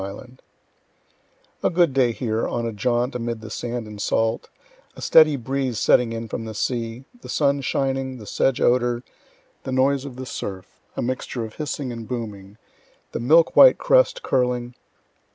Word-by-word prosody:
I._ 125 Hz, +6 st, -9 dB, 1.2 s
A -, -, +2 dB
good 170 Hz, -4 st, +2 dB
day 130 Hz, -3 st, +3 dB
here, 115 Hz, -1 st, -2 dB
on 120 Hz, -1 st, -2 dB
a 115 Hz, -, -2 dB
jaunt, 120 Hz, +4 st, 0 dB
amid 115 Hz, -2 st, -3 dB
the 110 Hz, -1 st, -9 dB
sand 120 Hz, 0 st, -4 dB
and 105 Hz, -1 st, -9 dB
salt, 115 Hz, +1 st, 0 dB, 0.5 s
a -, -, -12 dB
steady 155 Hz, -2 st, +5 dB
breeze 130 Hz, -1 st, -2 dB
setting 120 Hz, +1 st, +3 dB
in 115 Hz, 0 st, -5 dB
from 115 Hz, -, -5 dB
the 110 Hz, -1 st, -7 dB
sea, 115 Hz, +2 st, -3 dB, 0.2 s
the -, -, -11 dB
sun 140 Hz, -1 st, +1 dB
shining, 135 Hz, -1 st, -1 dB
the 110 Hz, -, -11 dB
sedge 135 Hz, +4 st, 0 dB
odor, 120 Hz, 0 st, +2 dB, 0.6 s
the 130 Hz, -, -6 dB
noise 135 Hz, +1 st, +2 dB
of 140 Hz, -3 st, -8 dB
the 130 Hz, +1 st, -7 dB
surf, 95 Hz, -6 st, -7 dB, 0.2 s
a -, -, -1 dB
mixture 125 Hz, -1 st, -3 dB
of 110 Hz, -, -12 dB
hissing 145 Hz, -3 st, -4 dB
and 115 Hz, -2 st, -7 dB
booming, 105 Hz, -5 st, -6 dB, 0.5 s
the -, -, -4 dB
milk 160 Hz, +8 st, +4 dB
white -, -, +8 dB
crest -, -, +3 dB
curling. 125 Hz, -1 st, 0 dB
125 Hz, 170 wpm, -23 LUFS, 115-135 Hz, 1.2 s, white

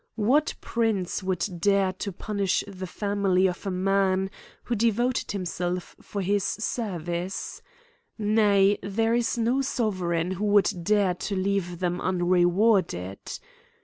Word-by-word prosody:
What 260 Hz, +8 st, +2 dB
prince 220 Hz, -6 st, -1 dB
would 185 Hz, -2 st, -1 dB
dare 195 Hz, 0 st, +2 dB
to 200 Hz, +2 st, -5 dB
punish 200 Hz, +1 st, -1 dB
the 190 Hz, -2 st, -7 dB
family 200 Hz, -1 st, +1 dB
of 185 Hz, +2 st, -2 dB
a -, -, +1 dB
man 190 Hz, 0 st, +1 dB, 0.3 s
who 240 Hz, -, -2 dB
devoted 235 Hz, +3 st, +1 dB
himself 180 Hz, -2 st, -3 dB
for 200 Hz, -2 st, -4 dB
his 200 Hz, +1 st, +1 dB
service? 185 Hz, -6 st, -3 dB, 0.3 s
— -, -, -40 dB
Nay, 205 Hz, -2 st, +3 dB
there 225 Hz, +3 st, 0 dB
is 240 Hz, 0 st, +1 dB
no 235 Hz, +3 st, +1 dB
soveseign 185 Hz, -9 st, -1 dB
who 195 Hz, +3 st, -3 dB
would 205 Hz, -2 st, +4 dB
dare 205 Hz, -1 st, +3 dB
to 190 Hz, +3 st, -4 dB
leave 190 Hz, -2 st, -1 dB
them 180 Hz, 0 st, -2 dB
un 180 Hz, -2 st, 0 dB
rewarded. 175 Hz, -, +2 dB
195 Hz, 135 wpm, -26 LUFS, 180-210 Hz, 0.3 s, would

